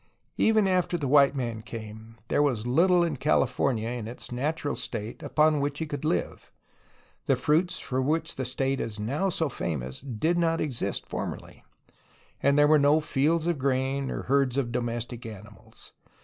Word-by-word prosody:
Even 220 -2 +4
after 180 -2 +1
the 145 -4 -2
white 140 +1 +5
man 120 -4 -3
came, 110 -1 -9
there - - +2
was 125 -7 +1
little 175 +8 +4
in 160 -5 -1
Cali 150 +1 +3
fornia 125 -2 -1
in 110 - -6
its 120 +2 -8
natural 145 +4 -2
state 110 -1 -5
upon 155 -1 +2
which 145 0 -1
he 160 - -2
could 145 -2 -5
live. 90 - -2 0.8
The - - +4
fruits 165 +4 +1
for 130 0 -2
which 155 +5 0
the 130 - -3
state 135 +2 -1
is 110 -1 -4
now 140 - -1
so 160 -2 0
famous 70 - -4
did 140 +7 -1
not 165 -1 +1
exist 120 -9 -2
formerly, - - -6 0.8
and 140 +1 +3
there 145 0 +6
were 155 0 +5
no 145 +2 +4
fields 155 +2 +1
of 170 -4 0
grain 135 +1 0
or - - -4
herds 135 -1 +1
of 125 -4 0
do 120 - 0
mestic 120 +1 -4
animals. 105 0 -12
135 Hz, 175 wpm, -27 LUFS, 120-155 Hz, 0.8 s, there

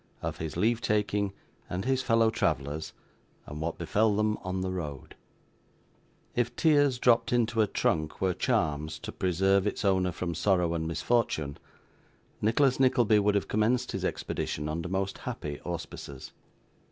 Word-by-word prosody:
Of - - -3
his 80 0 -5
Leave 115 +5 +2
taking 105 -2 0 0.4
and 90 +3 -3
his 130 0 +1
Fellow 115 -2 +3
Travellers, 75 -7 -1 0.5
and 75 +1 -7
what 85 +1 -2
befell 105 +5 +2
them 105 0 +1
on 95 0 -3
the 95 0 -2
Road 75 -7 -6 1.2
If 120 0 0
tears 145 -5 +4
dropped 120 -1 +3
into 120 -2 +2
a 105 - +3
trunk 80 -5 -1
were 95 -1 +1
charms 80 - 0
to - - -7
preserve 95 +2 +2
its 105 - -2
owner 95 -2 +2
from 85 0 -3
sorrow 90 -1 +2
and 80 -1 -2
misfortune, 80 -4 0 0.8
Nicholas 125 +5 +3
Nickleby 120 -5 +4
would 105 0 +2
have 100 - 0
commenced 110 +4 +1
his - - -4
expedition 75 +1 -2
under 85 +3 -3
most 95 +1 -2
happy 75 -1 -5
auspices. 80 -5 -7
95 Hz, 150 wpm, -29 LUFS, 85-115 Hz, 1.2 s, tears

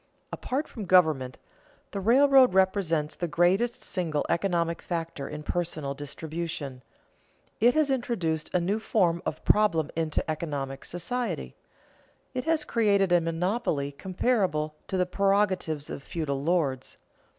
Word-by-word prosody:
Apart 275 +4 -3
from 215 -4 -7
government, 155 -8 +3 0.5
the 200 - -3
railroad 260 +2 +5
represents 185 -5 +2
the 175 - -2
greatest 185 +9 +1
single 160 -6 -1
economic 170 -2 0
factor 165 -5 -4
in 150 - -6
personal 160 -5 -2
distribution. 145 -1 -5 0.8
It 240 +3 +4
has 305 -3 +3
introduced 180 - -1
a 180 - +2
new 195 +5 0
form 180 -6 +1
of 155 - -5
problem 170 -8 +3
into 160 -2 -1
economic 145 -4 -4
society. 245 +8 -3 0.8
It 255 +1 -3
has 320 -2 +1
created 200 -7 +2
a 175 -1 +5
monopoly 165 -3 -1
comparable 180 - 0
to 190 - -2
the 180 - +2
prerogatives 185 -5 +1
of - - -6
feudal 140 -2 -3
lords. 145 -5 -1
175 Hz, 130 wpm, -27 LUFS, 155-205 Hz, 0.8 s, railroad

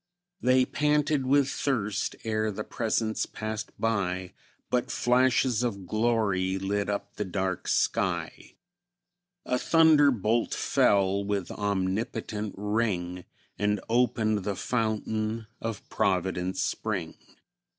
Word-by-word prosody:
They 130 0 +4
panted 150 -2 +1
with 140 0 +4
thirst, 110 -8 -1
ere 110 -1 0
the 105 +2 -4
Presence 110 -1 -1
passed 110 0 -5
by, 95 -5 -1 0.4
But 125 -1 +1
flashes 125 -1 +2
of 100 -6 -2
glory 105 -3 +1
lit 100 +1 -1
up 100 0 -4
the - - 0
dark 95 -1 -2
sky; - - -1 0.9
A 125 - 0
thunderbolt 140 - +4
fell, 100 0 +2
with 100 -2 -2
omnipotent 105 +1 -2
ring, 100 -4 -1 0.3
And 105 0 +1
opened 110 -3 +2
the 100 0 -2
fountain 110 0 -1 0.2
of 115 -3 -5
Providence 95 -1 0
Spring. 95 -7 -2
110 Hz, 105 wpm, -28 LUFS, 100-120 Hz, 0.9 s, They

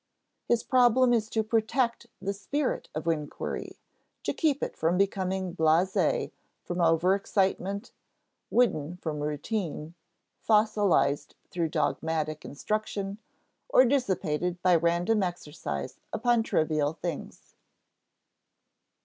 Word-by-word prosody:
His 235 -1 +2
problem 250 0 +4
is 220 -2 +1
to 220 -1 0
protect 235 +2 0
the 200 - -2
spirit 265 +8 -2
of 155 - -3
inquiry, 150 -3 -3 0.5
to - - -1
keep 295 -4 +1
it - - -3
from 165 +3 +1
becoming 190 -2 0
blasé 175 - +2 0.3
from 175 0 -4
overexcitement, 190 +4 +1 0.6
wooden 180 -9 +1
from 155 -4 -4
routine, 150 +1 -3 0.5
fossilized 210 -9 +2 0.2
through 170 -2 -1
dogmatic 155 -1 -1
instruction, 200 +5 -3 0.5
or 260 - +6
dissipated 180 - 0
by 180 -1 +5
random 170 +6 +2
exercise 150 - -4
upon 240 0 +2
trivial 155 -7 +1
things. 170 -2 -6
185 Hz, 100 wpm, -28 LUFS, 160-220 Hz, 0.6 s, or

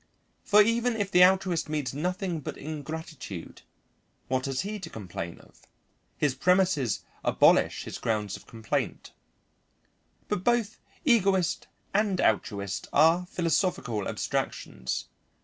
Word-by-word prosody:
For 210 0 +6
even 230 +2 +1
if 205 -3 -2
the 180 0 +7
altruist 185 -3 +3
meets 145 -4 -2
nothing 180 +3 -2
but 145 - -6
ingratitude, 155 - -7 0.7
what 130 +1 0
has 135 -1 -1
he 210 +3 -4
to 175 -4 -7
complain 90 - -6
of? - - -20 0.6
His 145 -3 +1
premises 175 - +2 0.2
abolish - - +4
his - - -7
grounds 105 -3 -1
of - - -13
complaint. 110 -2 -3 1.2
But 180 - -2
both 235 -2 +1 0.3
egoist 195 - +3 0.3
and 200 -2 +2
altruist 100 -2 0
are 165 +4 +4
philosophical 170 - 0
abstractions. 60 - -3
165 Hz, 115 wpm, -28 LUFS, 130-190 Hz, 1.2 s, the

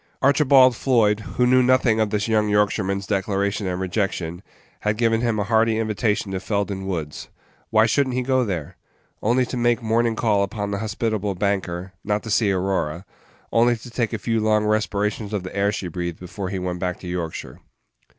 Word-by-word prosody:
Archibald 135 -2 +5
Floyd, 110 -5 +2 0.2
who 125 - +4
knew 130 +1 +5
nothing 125 -3 +3
of 110 -1 +2
this 105 +1 -1
young 105 -1 +2
Yorkshireman's 100 -1 +1
declaration 100 0 -1
and 90 0 -2
rejection, 90 -3 -2 0.4
had 105 0 -1
given 115 -1 +2
him 115 -3 0
a 105 - +1
hearty 110 +1 +2
invitation 110 -2 -1
to 95 - -2
Felden 100 -1 -2
Page 95 - -7
39 - - -5
Woods. 80 -6 -4 0.4
Why 110 0 +4
should 140 +4 +2
n't 125 - -3
he 125 - 0
go 130 0 +2
there? 90 -5 -4 0.4
Only 125 +4 +2
to 130 - -6
make 120 0 +2
a - - -9
morning 115 +1 +2
call 105 -3 +2
upon 100 0 -2
the 100 - -2
hospitable 110 -2 -2
banker; 95 -2 -2
not 105 0 -1
to 110 - -5
see 105 -2 +3
Aurora; 95 -3 -1 0.5
only 120 +1 +3
to 120 +2 -12
take 115 -2 -1
a - - -2
few 115 -1 -1
long 105 0 +2
respirations 105 0 -1
of 100 -3 -2
the 95 - -8
air 100 +1 +2
she 100 -3 -4
breathed 85 -1 -4
before 90 +1 -6
he 95 - -3
went 90 -1 -3
back 90 -1 -2
to 90 - -8
Yorkshire. 85 -7 -5
105 Hz, 200 wpm, -23 LUFS, 95-115 Hz, 0.5 s, Archibald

